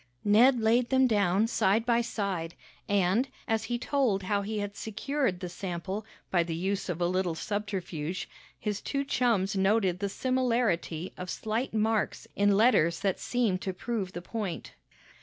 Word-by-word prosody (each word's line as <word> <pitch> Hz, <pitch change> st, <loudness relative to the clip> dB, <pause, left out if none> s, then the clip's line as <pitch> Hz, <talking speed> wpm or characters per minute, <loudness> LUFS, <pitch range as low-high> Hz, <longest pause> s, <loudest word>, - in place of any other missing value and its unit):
Ned 235 Hz, +5 st, +5 dB
laid 235 Hz, +2 st, +3 dB
them 265 Hz, 0 st, +4 dB
down 205 Hz, -3 st, +3 dB
side 225 Hz, -1 st, +2 dB
by 235 Hz, -1 st, +3 dB
side, 195 Hz, -7 st, -3 dB, 0.3 s
and, 200 Hz, +5 st, +2 dB, 0.2 s
as 225 Hz, -2 st, 0 dB
he 240 Hz, +1 st, -1 dB
told 245 Hz, -6 st, +1 dB
how 200 Hz, +2 st, 0 dB
he 215 Hz, +2 st, -3 dB
had 205 Hz, -1 st, -3 dB
secured 220 Hz, -2 st, -2 dB
the 180 Hz, -, -4 dB
sample 190 Hz, +3 st, -5 dB, 0.2 s
by 175 Hz, -, +4 dB
the 165 Hz, -1 st, -2 dB
use 190 Hz, +3 st, -2 dB
of 175 Hz, -1 st, -2 dB
a 175 Hz, -, +2 dB
little 180 Hz, -1 st, 0 dB
subterfuge, 185 Hz, -4 st, -3 dB, 0.3 s
his 210 Hz, -2 st, -3 dB
two 280 Hz, 0 st, -2 dB
chums 220 Hz, -8 st, +1 dB
noted 190 Hz, -2 st, +2 dB
the 200 Hz, 0 st, -1 dB
similarity 230 Hz, -9 st, 0 dB
of 180 Hz, 0 st, -6 dB
slight 220 Hz, +4 st, -2 dB
marks 220 Hz, 0 st, 0 dB
in 205 Hz, 0 st, +3 dB
letters 170 Hz, -8 st, +4 dB
that 195 Hz, -2 st, 0 dB
seemed 225 Hz, -7 st, 0 dB
to 190 Hz, -, -3 dB
prove 195 Hz, -1 st, -3 dB
the 175 Hz, -, -6 dB
point. 205 Hz, -4 st, -4 dB
205 Hz, 160 wpm, -29 LUFS, 185-230 Hz, 0.3 s, Ned